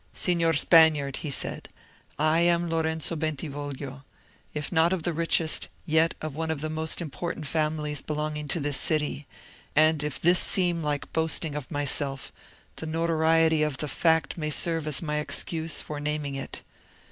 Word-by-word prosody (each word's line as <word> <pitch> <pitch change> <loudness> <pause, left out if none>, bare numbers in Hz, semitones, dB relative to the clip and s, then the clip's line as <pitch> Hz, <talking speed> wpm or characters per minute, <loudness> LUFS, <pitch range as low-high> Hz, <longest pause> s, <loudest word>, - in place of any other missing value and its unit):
"Signor 170 -2 +2
Spaniard," 150 -3 +4
he 155 - -4
said, 140 - -2 0.5
"I 155 +2 +3
am 170 0 +2
Lorenzo 160 0 -1
Bentivoglio; 145 -3 -5 0.5
if 150 -1 -4
not 165 +1 +3
of 180 -4 -2
the 175 - 0
richest, 165 0 +1 0.2
yet 160 +1 +2
of 155 -3 -4
one 160 +1 -3
of 160 -3 -2
the 155 0 -3
most 160 +2 0
important 165 +1 -5
families 150 -1 -1
belonging 150 0 -3
to 165 - 0
this 145 -2 0
city; 150 -2 0 0.5
and 155 0 +4
if 150 -2 -3
this 175 +2 +4
seem 175 -3 +3
like 150 -2 -3
boasting 160 -1 +1
of 150 -3 -6
myself, 145 -2 -1 0.5
the 160 - -5
notoriety 160 0 +2
of 150 -3 0
the 150 - -3
fact 160 +4 +1
may 155 -1 -2
serve 165 0 0
as 150 +2 +2
my 150 -2 -2
excuse 160 +1 -3
for 150 -1 -6
naming 150 -1 -2
it. 135 0 -6
155 Hz, 160 wpm, -27 LUFS, 150-165 Hz, 0.5 s, Spaniard